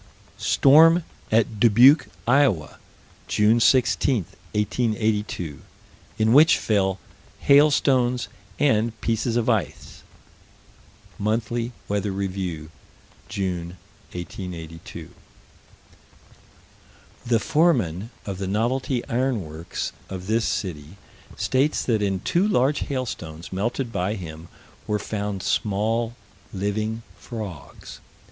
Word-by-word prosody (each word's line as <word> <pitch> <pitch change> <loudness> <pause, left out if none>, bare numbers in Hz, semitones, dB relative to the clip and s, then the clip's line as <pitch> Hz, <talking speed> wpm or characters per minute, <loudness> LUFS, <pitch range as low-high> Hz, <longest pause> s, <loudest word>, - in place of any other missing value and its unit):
Storm 165 +5 +6 0.3
at 110 -1 +2
Dubuque, 120 +7 +6 0.2
Iowa, 125 - +2 0.5
June 110 +3 +3
16, 125 - +3 0.3
1882, 105 - -1 0.6
in 110 +1 +3
which 155 +4 +7
fell 95 -3 +1 0.4
hailstones 135 -4 +4 0.3
and 115 -5 +1
pieces 115 +1 0
of 120 -2 0
ice 110 -6 -2 1.2
(Monthly 115 +3 -1 0.2
Weather 100 0 -1
Review, 95 -5 -4 0.6
June, 90 -3 -3 0.4
1882): 85 -2 -8 2.1
"The 115 -1 +2
foreman 115 - +1 0.2
of 95 -2 -5
the 95 - -3
Novelty 120 +5 -1
Iron 125 - 0
Works, 80 +2 -5 0.2
of 95 -1 -6
this 110 +3 +1
city, 80 -1 -4 0.4
states 135 +4 +1
that 110 -4 +1
in 95 -2 -1
two 180 - +1
large 145 -7 +2
hailstones 90 - -5
melted 115 +5 -2
by 95 +1 -1
him 80 -4 -8 0.4
were 105 - +1
found 100 -2 -4
small 115 +3 0 0.4
living 110 +3 -2 0.2
frogs." 105 - -8
110 Hz, 95 wpm, -24 LUFS, 95-120 Hz, 2.1 s, which